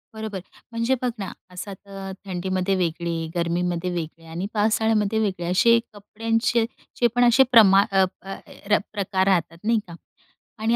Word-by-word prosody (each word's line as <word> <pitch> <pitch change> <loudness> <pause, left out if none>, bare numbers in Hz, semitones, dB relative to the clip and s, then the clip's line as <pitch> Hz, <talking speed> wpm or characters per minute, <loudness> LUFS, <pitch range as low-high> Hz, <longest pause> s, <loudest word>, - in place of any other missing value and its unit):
बरोबर. 220 -3 -5 0.3
म्हणजे 230 +3 +1
बघ 250 - +1
ना, 195 - -4 0.2
असा 180 +2 -7
तर 195 0 -9
थंडीमध्ये 185 +1 -1
वेगळे, 170 -1 -1 0.2
गर्मीमध्ये 175 +1 -1
वेगळे 165 -1 -5
आणि 170 +4 -3
पावसाळ्यामध्ये 220 0 +2
वेगळे, 190 -5 -1
असे 230 +5 +5
कपड्यांचे 225 +3 0 0.4
जे 240 - +6
पण 245 - +4
असे 240 +3 +6
प्रमाण 200 -4 +7
अ, 195 -1 +4 0.2
अ, 195 - -11
अ, - - -4 0.3
र 210 - +5 0.2
प्रकार 190 -2 0
राहतात, 170 -3 +1
नाही 225 +1 +2
का? 170 - -9 0.6
आणि 225 +2 +2
195 Hz, 155 wpm, -23 LUFS, 180-220 Hz, 0.6 s, प्रमाण